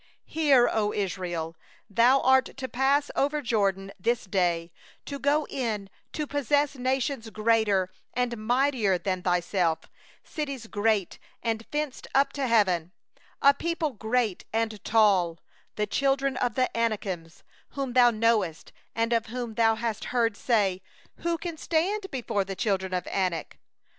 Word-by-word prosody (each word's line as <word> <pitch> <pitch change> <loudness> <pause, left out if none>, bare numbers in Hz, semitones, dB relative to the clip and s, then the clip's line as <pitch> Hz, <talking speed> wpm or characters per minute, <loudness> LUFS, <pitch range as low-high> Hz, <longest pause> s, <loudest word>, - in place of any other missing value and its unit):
Hear, 285 -6 +4
O 210 -1 0
Israel: 175 -4 -3 0.3
thou 240 +6 +4
art 260 0 +3
to 265 -1 -4
pass 275 +3 +1
over 290 +2 +1
the 295 - -4
Jordan 195 -4 0
this 235 +5 0
day, 175 -3 0 0.3
to 280 -1 -5
go 290 +2 +2
in 215 -7 -3 0.2
to 305 - -2
dispossess 285 0 +1
nations 260 -2 -1
greater 215 -4 +2 0.2
and 245 -1 0
mightier 245 -6 +2
than 185 0 -2
thyself, 175 -2 +1 0.4
cities 280 -6 -5
great 210 -3 0 0.2
and 225 -1 -2
fortified 295 -3 -3
up 275 +1 +3
to 275 -2 -1
heaven, 185 -7 +2 0.5
2a 280 0 +6
people 335 -2 -1
great 220 -2 -1
and 220 -1 -2
tall, 195 -7 +3 0.4
the 210 0 -1
sons 275 0 +1
of 245 -3 0
the 255 -1 0
Anakim, 205 -7 -1 0.5
whom 270 -3 -3
thou 245 -1 +7
knowest, 215 -7 0 0.2
and 230 +1 +1
of 230 -1 +1
whom 240 0 -5
thou 225 0 +3
hast 225 -1 -3
heard 230 -3 +1
say: 200 -6 +1 0.4
'Who 340 0 -1
can 335 0 -5
stand 385 +6 0
before 230 -6 -1
the 195 0 -6
sons 195 -4 +1
of 180 -1 -2
Anak? 180 -4 -2
230 Hz, 145 wpm, -27 LUFS, 195-270 Hz, 0.5 s, thou